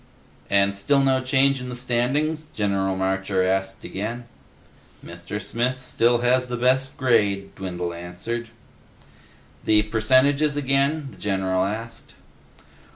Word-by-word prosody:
"And 100 Hz, 0 st, +3 dB
still 140 Hz, +9 st, +2 dB
no 135 Hz, -1 st, +2 dB
change 135 Hz, 0 st, +2 dB
in 125 Hz, -, -6 dB
the 125 Hz, -, -5 dB
standings?" 135 Hz, +6 st, 0 dB
General 100 Hz, -2 st, 0 dB
Marcher 95 Hz, 0 st, 0 dB
asked 95 Hz, +1 st, -1 dB
again. 115 Hz, +5 st, -5 dB, 0.8 s
"Mr. 85 Hz, +4 st, -6 dB
Smith 125 Hz, +4 st, -2 dB
still 120 Hz, +1 st, +2 dB
has 125 Hz, +1 st, +2 dB
the 125 Hz, 0 st, -3 dB
best 130 Hz, +2 st, +1 dB
grade," 105 Hz, -6 st, +1 dB
Dwindle 90 Hz, -2 st, -4 dB
answered. 90 Hz, +8 st, -5 dB, 1.2 s
"The 105 Hz, -1 st, +4 dB
percentages 130 Hz, +7 st, +2 dB
again?" 140 Hz, +1 st, 0 dB
the -, -, -15 dB
general 95 Hz, -2 st, 0 dB
asked. 115 Hz, +3 st, -6 dB
115 Hz, 120 wpm, -23 LUFS, 95-130 Hz, 1.2 s, The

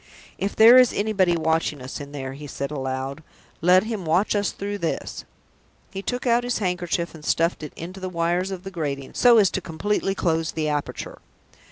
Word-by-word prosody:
"If 200 Hz, -, -2 dB
there 230 Hz, +3 st, +9 dB
is 255 Hz, -2 st, +6 dB
anybody 195 Hz, -5 st, +1 dB
watching 160 Hz, -2 st, 0 dB
us 130 Hz, +3 st, -7 dB
in 140 Hz, 0 st, -9 dB
there," 135 Hz, -2 st, -5 dB
he 145 Hz, +2 st, -9 dB
said 140 Hz, +1 st, -5 dB
aloud, 135 Hz, 0 st, -4 dB, 0.4 s
"let 180 Hz, +3 st, +5 dB
him 220 Hz, -3 st, -4 dB
watch 175 Hz, +7 st, +1 dB
us 205 Hz, 0 st, +1 dB
through 205 Hz, +1 st, -5 dB
this!" 165 Hz, -, -3 dB, 0.7 s
He 195 Hz, -, -5 dB
took 245 Hz, +5 st, -3 dB
out 240 Hz, 0 st, +3 dB
his 245 Hz, 0 st, -1 dB
handkerchief, 180 Hz, -3 st, -2 dB
and 160 Hz, -2 st, -12 dB
stuffed 165 Hz, +3 st, +1 dB
it 150 Hz, -, -7 dB
into 180 Hz, +4 st, -8 dB
the 185 Hz, 0 st, -4 dB
wires 175 Hz, +2 st, 0 dB
of 190 Hz, -2 st, -6 dB
the 195 Hz, -, -7 dB
grating, 140 Hz, -6 st, -4 dB
so 240 Hz, -2 st, +6 dB
as 200 Hz, -4 st, +5 dB
completely 195 Hz, +3 st, -1 dB
to -, -, -10 dB
close 165 Hz, -1 st, 0 dB
the 155 Hz, -1 st, -1 dB
aperture. 145 Hz, -1 st, -4 dB
175 Hz, 195 wpm, -24 LUFS, 155-200 Hz, 0.7 s, there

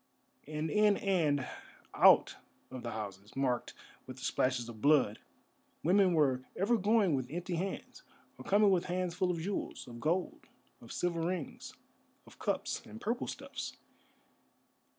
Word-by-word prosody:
And 155 Hz, +1 st, -3 dB
in 210 Hz, +1 st, +4 dB
and 155 Hz, -9 st, +1 dB, 0.5 s
out -, -, +6 dB, 0.3 s
of 130 Hz, -1 st, -6 dB
the 120 Hz, -, -4 dB
houses 105 Hz, -2 st, -7 dB
marked 130 Hz, -3 st, -1 dB, 0.3 s
with 130 Hz, 0 st, -8 dB
the -, -, -10 dB
splashes 130 Hz, -2 st, 0 dB
of 110 Hz, -2 st, -10 dB
blood 140 Hz, -8 st, +4 dB, 0.6 s
women 185 Hz, +2 st, +4 dB
were 135 Hz, -5 st, +3 dB
ever 205 Hz, +5 st, +2 dB
going 205 Hz, -3 st, +3 dB
with 130 Hz, -2 st, -1 dB
empty 175 Hz, +3 st, -4 dB
hands, 185 Hz, +3 st, -4 dB, 0.4 s
or -, -, -8 dB
coming 205 Hz, +1 st, +4 dB
with 180 Hz, -2 st, +2 dB
hands 180 Hz, -1 st, -1 dB
full 185 Hz, 0 st, 0 dB
of 175 Hz, -, 0 dB
jewels, 195 Hz, +5 st, -4 dB
of 120 Hz, -1 st, -9 dB
gold, 185 Hz, -, -1 dB, 0.3 s
of -, -, -12 dB
silver 170 Hz, -2 st, -1 dB
rings, 170 Hz, -2 st, -4 dB, 0.5 s
of -, -, -17 dB
cups, -, -, -2 dB
and 110 Hz, +1 st, -11 dB
purple 235 Hz, -, -2 dB
stuffs. -, -, -6 dB
165 Hz, 150 wpm, -33 LUFS, 130-190 Hz, 0.6 s, out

